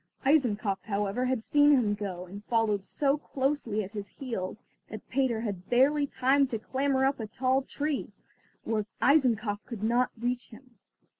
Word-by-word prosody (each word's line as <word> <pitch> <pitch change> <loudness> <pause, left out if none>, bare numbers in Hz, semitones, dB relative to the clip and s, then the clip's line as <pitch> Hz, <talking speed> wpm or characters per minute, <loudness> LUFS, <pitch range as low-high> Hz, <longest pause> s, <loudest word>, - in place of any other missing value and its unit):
Eisenkopf, 220 -9 +2
however, 205 +3 -1
had 255 -3 -1
seen 290 +3 +4
him 230 -7 +3
go, 195 -3 -5
and 200 +3 -10
followed 220 -4 +1
so 280 +4 +1
closely 265 -7 -1
at 195 - -8
his 205 -2 -6
heels 220 -7 -5 0.3
that 215 -1 -9
Peter 250 -4 +1
had 195 -5 -5
barely 285 +4 +3
time 270 +1 +2
to 235 - -3
clamber 265 +3 0
up 275 0 +1
a 220 - -4
tall 260 +4 +1
tree, 290 +2 -3 0.5
where 215 -2 -1
Eisenkopf 235 -7 +2
could 225 -4 -6
not 240 +3 +2
reach 245 +1 -2
him. 250 +2 -15
240 Hz, 160 wpm, -29 LUFS, 210-270 Hz, 0.5 s, seen